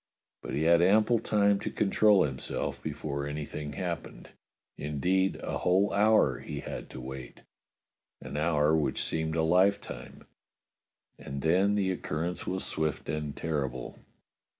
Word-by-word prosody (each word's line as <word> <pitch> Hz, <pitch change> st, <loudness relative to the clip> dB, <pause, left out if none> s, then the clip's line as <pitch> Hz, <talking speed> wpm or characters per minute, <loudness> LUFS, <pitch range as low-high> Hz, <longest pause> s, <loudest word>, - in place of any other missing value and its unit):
But -, -, -5 dB
he 75 Hz, -, 0 dB
had 85 Hz, +1 st, +5 dB
ample 110 Hz, +5 st, +4 dB
time 100 Hz, -2 st, +2 dB
to -, -, -3 dB
control 105 Hz, -1 st, +4 dB
himself 65 Hz, -2 st, -3 dB
before 70 Hz, -1 st, -4 dB
anything 75 Hz, 0 st, -5 dB
happened; 90 Hz, -3 st, -5 dB, 0.5 s
indeed, 90 Hz, +6 st, 0 dB
a -, -, -3 dB
whole 95 Hz, +3 st, +2 dB
hour 105 Hz, -, +4 dB
he -, -, -6 dB
had -, -, -7 dB
to -, -, -9 dB
wait 65 Hz, -1 st, -8 dB, 0.4 s
— -, -, -61 dB
an -, -, -7 dB
hour 75 Hz, 0 st, +2 dB
which 80 Hz, -2 st, 0 dB
seemed 80 Hz, 0 st, -1 dB
a 80 Hz, -, +2 dB
lifetime; 95 Hz, +5 st, +1 dB, 0.9 s
and 70 Hz, 0 st, -6 dB
then 95 Hz, +5 st, +3 dB
the 95 Hz, -2 st, +1 dB
occurrence 85 Hz, 0 st, -3 dB
was 95 Hz, 0 st, -2 dB
swift 80 Hz, -2 st, -2 dB
and 75 Hz, -1 st, -3 dB
terrible. 70 Hz, -6 st, -3 dB
80 Hz, 140 wpm, -29 LUFS, 75-95 Hz, 0.9 s, had